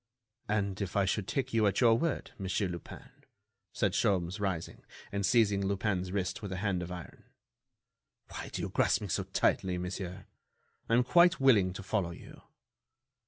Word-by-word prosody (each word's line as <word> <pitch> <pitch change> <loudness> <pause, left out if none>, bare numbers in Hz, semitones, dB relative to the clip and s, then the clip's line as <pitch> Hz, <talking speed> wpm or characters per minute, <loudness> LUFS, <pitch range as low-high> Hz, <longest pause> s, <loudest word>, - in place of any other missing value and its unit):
"And 100 -2 -1
if 95 -2 -4
I 100 - +3
should 100 +1 -1
take 135 -4 -2
you 110 -2 +4
at 100 - +1
your 115 -2 +6
word, 155 +5 -1
Monsieur 95 +1 -1
Lupin?" 85 -2 -9 0.6
said - - 0
Sholmes, 95 0 0
rising, 95 -5 -3 0.3
and 100 0 -2
seizing 100 -2 +3
Lupin's 95 -2 -1
wrist 95 +1 -2
with 100 -3 -6
a 95 - -3
hand 95 -2 -1
of 90 0 -6
iron. 90 -2 -9 1.1
"Why - - -7
do - - -4
you - - -2
grasp - - +2
me - - -5
so - - -1
tightly, 90 -1 +1
monsieur? 90 +1 -5 0.6
I 115 - +4
am 125 - +4
quite 170 +6 +5
willing 110 -9 +5
to 100 - -7
follow 95 -3 -1
you." 85 - -12
100 Hz, 170 wpm, -31 LUFS, 90-105 Hz, 1.1 s, your